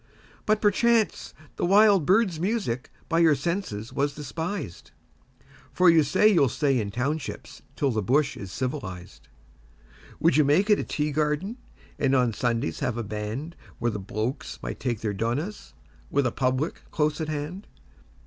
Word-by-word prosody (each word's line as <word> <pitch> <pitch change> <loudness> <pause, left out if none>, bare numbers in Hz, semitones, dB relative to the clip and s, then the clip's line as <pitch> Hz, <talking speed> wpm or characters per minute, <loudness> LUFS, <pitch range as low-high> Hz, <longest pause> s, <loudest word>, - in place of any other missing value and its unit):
But, 215 0 +2
perchance, 220 -1 +2 0.3
the - - 0
wild 200 -4 +5
birds' 190 -4 +3
music 180 - -1 0.2
by 165 0 +1
your 160 -3 +5
senses 155 - -3
was 140 +1 0
despised, 160 - -5 0.8
For 180 -1 +5
you 165 -1 +5
say 150 +8 +3
you'll 170 -11 +4
stay 135 0 +1
in 105 -2 -2
townships 135 +7 -4
till 140 -2 +1
the 110 -2 0
bush 135 +7 +1
is 95 -2 -8
civilised. 95 - -5 0.9
Would 165 -3 +3
you 155 - +6
make 170 +10 +3
it 205 - +5
a - - -1
tea 150 0 -2
garden 150 - -1 0.4
and 135 -1 +2
on 125 -3 +2
Sundays 115 -7 -1
have 120 -1 -1
a 120 - -2
band 110 +10 -5 0.2
Where 120 - 0
the 105 - -4
'blokes' 110 +6 -4
might - - -5
take 120 -4 -2
their 105 -2 -1
'donahs', 120 - -3 0.3
with 140 -1 +1
a 125 - +1
'public' 130 +6 -1
close 150 0 0
at 155 - -3
hand? 155 +6 -5
145 Hz, 160 wpm, -26 LUFS, 120-170 Hz, 0.9 s, you